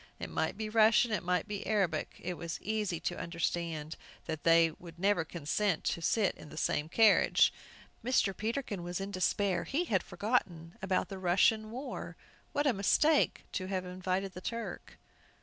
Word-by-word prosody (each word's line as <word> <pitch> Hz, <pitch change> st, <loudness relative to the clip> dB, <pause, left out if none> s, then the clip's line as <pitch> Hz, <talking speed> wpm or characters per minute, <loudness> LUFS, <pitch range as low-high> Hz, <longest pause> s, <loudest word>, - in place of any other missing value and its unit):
It -, -, -6 dB
might 160 Hz, +4 st, -1 dB
be 215 Hz, 0 st, -3 dB
Russian, 225 Hz, +2 st, +4 dB
it 210 Hz, -, 0 dB
might 180 Hz, -1 st, 0 dB
be 205 Hz, -1 st, -4 dB
Arabic. 190 Hz, -8 st, 0 dB
It 180 Hz, -, -2 dB
was 170 Hz, -1 st, -5 dB
easy 210 Hz, -5 st, -2 dB
to -, -, -3 dB
understand 165 Hz, -2 st, -3 dB, 0.3 s
that 160 Hz, -2 st, -4 dB
they 165 Hz, 0 st, +5 dB
would 170 Hz, +1 st, -13 dB
never 195 Hz, -1 st, +2 dB
consent 165 Hz, +3 st, -1 dB
to 170 Hz, -, -1 dB
sit 205 Hz, +3 st, +2 dB
in -, -, -13 dB
the 155 Hz, -, -11 dB
same 150 Hz, 0 st, 0 dB
carriage. 220 Hz, +2 st, +5 dB, 0.5 s
Mr. 225 Hz, -5 st, +2 dB
Peterkin 220 Hz, -3 st, -3 dB
was 175 Hz, +1 st, -4 dB
in 195 Hz, +1 st, -4 dB
despair; 190 Hz, 0 st, +1 dB
he 305 Hz, +6 st, -1 dB
had 195 Hz, -, +1 dB
forgotten 175 Hz, -5 st, -2 dB
about 190 Hz, -1 st, 0 dB
the 195 Hz, -2 st, -6 dB
Russian 195 Hz, +4 st, +3 dB
war! 255 Hz, +5 st, -6 dB, 0.3 s
What 290 Hz, -, 0 dB
a 275 Hz, -, +4 dB
mistake 290 Hz, +10 st, +3 dB
to 185 Hz, -, -3 dB
have 185 Hz, -1 st, -2 dB
invited 185 Hz, +1 st, -2 dB
the 180 Hz, -, -9 dB
Turk! 230 Hz, +3 st, -6 dB
190 Hz, 170 wpm, -32 LUFS, 170-215 Hz, 0.5 s, they